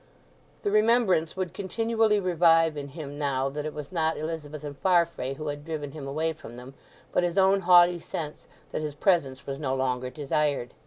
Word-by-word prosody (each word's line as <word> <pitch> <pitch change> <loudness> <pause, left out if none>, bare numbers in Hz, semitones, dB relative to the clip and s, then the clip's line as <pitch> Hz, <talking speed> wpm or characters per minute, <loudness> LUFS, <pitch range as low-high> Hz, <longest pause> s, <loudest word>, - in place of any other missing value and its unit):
The 205 - 0
remembrance 215 -6 +3
would 185 -2 -3
continually 225 +2 +1
revive 165 -3 +4
in 145 -1 -5
him 145 0 -8
now 135 -2 0
that 150 +2 -4
it 155 - -6
was 150 -2 -7
not 160 -2 0
Elizabeth 155 -1 -5
and 145 -1 -6
Farfrae 170 -6 +1
who 155 +1 -5
had 145 0 -5
driven 150 -3 -5
him 140 -1 -8
away 160 +4 -1
from 120 -6 -12
them, 125 +2 -10 0.4
but - - +2
his 175 +1 -1
own 195 +1 +5
haughty 175 -1 +6
sense 155 -2 -6 0.2
that - - -3
his 150 -2 -4
presence 145 -6 +1
was 135 0 -5
no 135 -3 -1
longer 130 -1 -1
desired. 145 -2 -1
155 Hz, 190 wpm, -27 LUFS, 140-175 Hz, 0.4 s, haughty